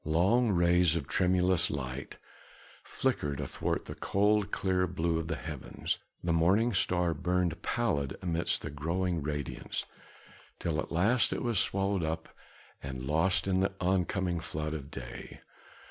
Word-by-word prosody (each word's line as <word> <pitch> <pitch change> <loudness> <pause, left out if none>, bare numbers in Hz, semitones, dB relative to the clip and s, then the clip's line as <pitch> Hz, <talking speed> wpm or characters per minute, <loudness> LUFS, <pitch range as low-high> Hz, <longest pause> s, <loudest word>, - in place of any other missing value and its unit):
Long 95 +10 +3
rays 85 -2 +4
of 75 -5 -2
tremulous 90 -1 +3
light 70 -1 -5 0.7
flickered 70 -2 -1
athwart - - -2
the - - -6
cold, 105 +1 +2
clear 95 -2 +1
blue 85 -1 0
of 80 - -4
the 80 - -1
heavens, 75 -3 -4 0.2
the 85 -1 +1
morning 95 +9 +3
star 90 -2 +2
burned 90 +1 0
pallid 75 - -1
amidst 85 -2 0
the 75 - -4
growing 85 +4 -1
radiance, 75 -1 -3 0.7
till 80 -3 -1
at - - -4
last 105 +9 +3
it - - -2
was 120 -5 +2
swallowed 100 -1 +1
up 80 0 -3 0.5
and 65 -2 -6
lost 85 +7 +2
in 95 -1 +2
the 95 +1 +1
oncoming 90 -1 +1
flood 75 -1 -4
of 70 -3 -6
day. 60 -6 -8
85 Hz, 145 wpm, -31 LUFS, 80-95 Hz, 0.7 s, rays